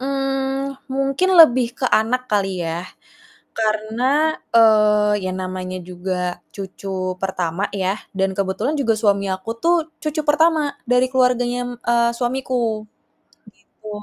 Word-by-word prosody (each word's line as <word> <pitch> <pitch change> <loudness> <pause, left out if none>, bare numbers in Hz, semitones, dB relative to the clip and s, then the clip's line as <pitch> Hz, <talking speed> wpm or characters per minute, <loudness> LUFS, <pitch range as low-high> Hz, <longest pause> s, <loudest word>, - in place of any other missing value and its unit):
Eee, 270 0 -2 0.2
mungkin 275 +7 0
lebih 260 -7 +7
ke 260 - 0
anak 250 +4 +2
kali 195 -3 0
ya 165 +1 -3 0.8
karena, 230 +8 +1 0.2
eee, 210 -2 +5
ya - - -1
namanya 185 0 -5
juga 180 0 -4 0.2
cucu 190 -1 -4
pertama 185 0 -1
ya 190 +1 -1 0.2
dan 190 0 +1
kebetulan 195 +10 -1
juga 230 -5 +2
suami 200 -2 +1
aku 190 +4 -7
tuh 345 +1 +4 0.3
cucu 310 0 -2
pertama 300 -1 +2
dari 250 +1 +3
keluarganya, 250 -1 +2 0.2
mmm, 235 0 +1
suamiku, 245 -3 -1 0.9
gitu. 215 - -12
225 Hz, 120 wpm, -20 LUFS, 195-265 Hz, 0.9 s, lebih